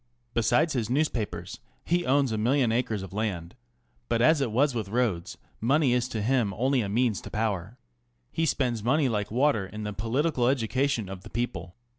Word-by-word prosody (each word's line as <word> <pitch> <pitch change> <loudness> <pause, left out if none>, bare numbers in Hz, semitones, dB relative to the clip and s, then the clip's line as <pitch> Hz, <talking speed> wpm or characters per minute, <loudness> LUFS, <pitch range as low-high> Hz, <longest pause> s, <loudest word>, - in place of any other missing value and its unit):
Besides 150 +8 +2
his 120 -5 -1
newspapers 110 - -2 0.3
he 175 +1 +1
owns 135 -1 +3
a 110 - -1
million 125 +1 +2
acres 110 -4 -1
of 95 -1 -9
land 95 -6 -3 0.5
But 115 - +1
as 150 +5 +4
it 125 -5 0
was 135 +5 +2
with 110 -5 -3
Rhodes, 105 -5 -1 0.2
money 135 +2 +3
is 125 0 +1
to 110 -4 -3
him 115 -5 +1
only 130 +4 +2
a 100 - -3
means 115 -1 +1
to - - -9
power. 105 0 -2 0.5
He 165 - 0
spends 120 -7 0
money 140 +4 +3
like 105 -4 -1
water 120 -4 +2
in 105 +2 -7
the 105 0 -4
political 120 +5 0
education 130 -2 0
of 95 -1 -7
the 105 - -12
people. 95 -7 -4
115 Hz, 185 wpm, -27 LUFS, 105-135 Hz, 0.5 s, as